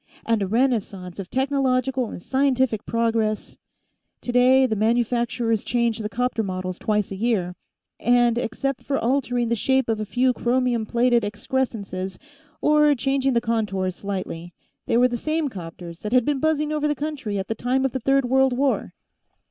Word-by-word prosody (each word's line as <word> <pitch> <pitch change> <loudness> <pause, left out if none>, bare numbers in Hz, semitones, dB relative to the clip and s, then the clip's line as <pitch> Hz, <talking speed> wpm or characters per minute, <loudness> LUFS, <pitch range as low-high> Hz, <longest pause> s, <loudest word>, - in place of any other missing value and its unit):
And 230 -2 +1
a 195 - 0
renaissance 205 -6 -1
of 190 -2 -6
technological 265 -2 0
and - - -7
scientific 260 -4 +1
progress 225 -2 -1 0.6
Today, 255 +2 +4
the 225 -4 0
manufacturers 235 0 +1
changed 235 -2 0
the 210 - -3
'copter 245 0 -1
models 185 -2 -4
twice 210 -2 0
a - - -3
year 195 -4 0 0.5
and, 240 0 +3
except 275 +2 -2
for 275 - -1
altering 245 -1 0
the 235 - +2
shape 265 +3 +1
of 220 -1 0
a 215 - -2
few 250 +4 +2
chromium 240 -2 0
plated 240 0 +2
excrescences 205 -4 -3 0.4
or 300 -1 +4
changing 270 +2 +1
the 235 - +2
contours 205 -6 -1
slightly, 180 -4 -5 0.3
they 230 - +2
were 250 +1 +5
the 240 -1 -3
same 310 +3 -1
'copters 170 -4 -9
that 210 +2 -4
had 250 -2 +4
been 290 -2 0
buzzing 305 0 +1
over 300 -1 0
the 295 - 0
country 285 -8 -4
at 195 0 -3
the - - -1
time 255 +4 0
of 270 - 0
the 260 - -3
Third 270 +2 +2
World 265 +1 +3
War. 275 0 0
240 Hz, 170 wpm, -23 LUFS, 215-265 Hz, 0.6 s, were